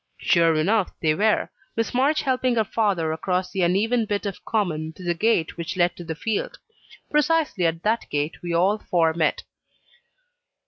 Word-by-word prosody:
Sure 165 -2 +3
enough 190 +6 +1
they 155 -2 +2
were 210 +6 +2 0.3
Miss 225 0 -1
March 280 +5 +2
helping 255 -2 +1
her 220 - +3
father 195 -7 0
across 180 +3 -2
the 190 - -2
uneven 215 +7 +2
bit 205 0 -2
of 200 -2 -5
common 165 -8 -1
to 185 - -12
the 175 -1 0
gate 175 -3 0
which 170 +2 -5
led 175 -1 +2
to 175 - -9
the 165 -1 -5
field. 215 +5 -3 0.5
Precisely 300 - +2
at 165 0 -3
that 225 +2 0
gate 150 +2 -2
we 175 - -4
all 190 +5 +2
four 165 -5 +1
met. 160 -1 0
185 Hz, 175 wpm, -24 LUFS, 165-220 Hz, 0.5 s, Sure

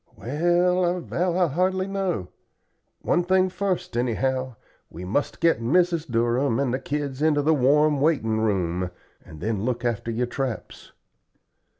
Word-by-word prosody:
"Well, 175 +7 +1
I 175 +1 +1
vow 180 0 -1
I 180 - +4
hardly 185 +4 0
know. 190 - -2 0.7
One 175 - +2
thing 185 +1 +2
first, 185 -7 -2
anyhow 130 +1 -1 0.3
we 85 +3 -8
must 110 +11 -1
get 165 -9 +2
Mrs. 165 +4 +1
Durham 120 +2 +1
and 135 -3 0
the 130 - -1
kids 145 -1 -4
into 150 -2 +2
the 160 +2 +3
warm 150 +2 +3
waiting 130 -8 +1
room, 90 -4 0 0.3
and 80 - -13
then 110 -3 -1
look 120 0 -2
after 120 0 -1
your 115 +2 0
traps." 125 -3 -5
140 Hz, 145 wpm, -24 LUFS, 120-175 Hz, 0.7 s, I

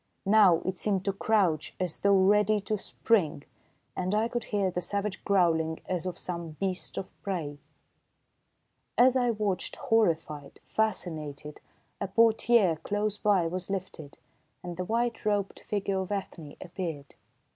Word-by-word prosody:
Now 195 -5 +5
it 185 -1 -2
seemed 195 -3 0
to 195 - +1
crouch 190 -7 +1
as 180 -3 -2
though 200 -1 +4
ready 210 +2 +4
to 215 - -1
spring, 190 -7 0 0.5
and 185 +2 -1
I 220 +2 +1
could 240 -1 -3
hear 200 -3 0
the 180 - -2
savage 200 +2 -2
growling 165 -5 +2
as 180 -1 -2
of 180 - -4
some 170 -3 -5
beast 190 -2 -3
of 190 - -5
prey. 160 -7 -4 1.4
As 255 +1 +6
I 245 -2 +2
watched, 210 -5 -1
horrified, 165 - 0
fascinated, 155 -9 -3 0.4
a - - -2
portière 220 -5 +3
close 205 +2 -2
by 200 -5 +3
was 180 +2 -3
lifted, 185 -6 -5 0.5
and 175 -1 -5
the 180 +1 -3
white 235 +2 -1
robed 205 -2 0
figure 200 -2 -2
of 190 +1 -4
Ethne 175 -7 -5
appeared. 165 -6 -6
190 Hz, 145 wpm, -29 LUFS, 170-210 Hz, 1.4 s, As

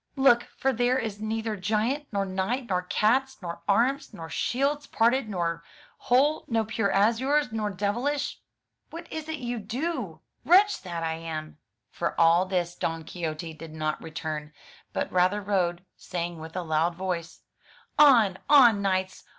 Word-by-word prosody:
Look; 265 -3 +4
for 270 0 +1
there 245 +2 +2
is 220 -5 -4
neither 220 0 -2
giant, 220 +9 -1
nor 200 -2 0
knight, 195 +7 -2
nor 180 -1 +1
cats, 250 +8 +1
nor 170 -2 -7
arms, 245 +5 +1
nor 165 -2 -8
shields 285 +3 -1
parted 235 +1 +2
nor 170 -3 -2 0.3
whole, 280 +5 +2
nor 225 -2 +1
pure 215 -2 -1
azures 235 +7 +2
nor 215 -2 -1
devilish. 225 +9 -2 0.5
What 335 +1 -8
is 315 0 -5
it 315 - -3
you 245 -3 -4
do? 225 - -4 0.2
Wretch 395 +5 +5
that 170 -3 -5
I 160 0 -2
am! 155 -2 -6 0.3
For 170 - -3
all 170 +2 +5
this 175 -2 -1
Don 165 -2 -3
Quixote 160 -1 -5
did 155 0 -10
not 155 -1 -2
return, 155 -1 -5 0.4
but - - -2
rather 185 +3 +2
rode, 185 -3 -1
saying 175 -2 -4
with 160 +2 -9
a 180 - -2
loud 160 +1 +1
voice, 180 -2 -4 0.6
*'0n, 235 -10 +6
on, 240 -8 +7
knights! 190 -1 -1
200 Hz, 155 wpm, -27 LUFS, 170-245 Hz, 0.6 s, on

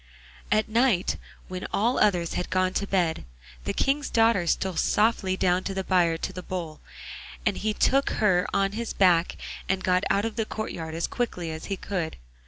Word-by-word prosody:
At 215 +1 +3
night, 230 -5 +2 0.3
when 185 0 -5
all 235 +5 +1
the - - +1
others 180 -5 +2
had 180 - -3
gone 185 +1 +1
to 200 - -1
bed, 175 -5 0 0.4
the - - 0
King's 285 +2 0
daughter 225 -6 +3
stole 190 +1 0
softly 205 -1 +2
down 185 0 +2
to 195 - -3
the 190 - -1
byre 175 -3 +2
to - - -4
the 180 - -6
Bull, 175 -4 -5 0.6
and - - +2
he 215 +2 -1
took 275 +1 +3
her 185 -4 +2
on 195 0 +1
his 230 +2 -4
back 180 -3 +3 0.3
and 190 0 0
got 185 0 +2
out 200 +2 +2
of 225 0 -4
the 225 - 0
courtyard 165 -8 -5
as 165 - 0
quickly 180 -9 -3
as 160 0 -6
he 195 - -3
could. 180 -6 -3
190 Hz, 190 wpm, -26 LUFS, 175-215 Hz, 0.6 s, At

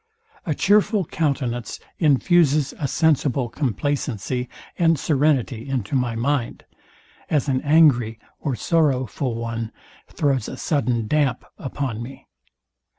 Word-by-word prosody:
A 155 - 0
chearful 205 +1 +3
countenance 130 -7 -2 0.2
infuses 150 -1 +3
a 145 - -1
sensible 140 -5 +1
complacency 125 -2 -2 0.3
and 165 -2 +4
serenity 135 -4 0
into 125 -5 -3
my 125 -3 0
mind; 125 +1 -1 0.6
as 150 -2 +1
an 130 -1 +1
angry 140 -8 +4 0.2
or 140 -5 -2
sorrowful 130 -2 0
one 115 -1 -4 0.4
throws 140 -4 0
a - - -7
sudden 125 -7 0
dump 135 0 0
upon 130 -4 -4
me. 130 +3 -9
135 Hz, 110 wpm, -22 LUFS, 120-150 Hz, 0.6 s, and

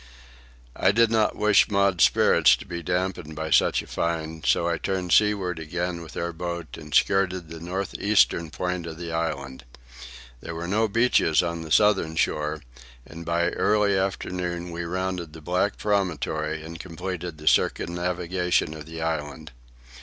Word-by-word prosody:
I - - +3
did 115 +1 +3
not 110 -2 +2
wish 105 +1 +4
Maud's 100 -4 +3
spirits - - +5
to - - -11
be 85 0 -5
dampened 90 -2 -2
by 80 0 -4
such - - +3
a - - -13
find, 80 -2 -3
so 85 - +2
I 85 -1 -1
turned 95 -2 -2
seaward 100 -5 +2
again 85 +2 -3
with 80 - -10
our 85 0 -2
boat 85 -1 -5
and 75 -2 -11
skirted 95 -1 +2
the 80 0 -8
north 90 +4 -4
eastern 100 -5 +2
point 85 +5 -3
of 80 -1 -7
the 85 -1 -6
island. 70 -6 -3 0.8
There 85 - -7
were 85 +1 -4
no 110 +4 +2
beaches 105 -7 +3
on 85 -1 -3
the 80 -1 -9
southern 95 -6 +3
shore, 75 -1 -1 0.4
and 85 +1 -10
by 85 +1 +1
early 105 -1 +2
afternoon 90 -2 -2
we 85 0 -4
rounded 90 -2 -3
the 80 - -10
black 90 +5 0
promontory 80 -6 -1
and 85 +1 -9
completed 90 -1 -6
the 75 0 -11
circumnavigation 90 -1 +1
of 75 -1 -9
the 80 0 -6
island. 80 -1 -4
85 Hz, 160 wpm, -25 LUFS, 80-95 Hz, 0.8 s, spirits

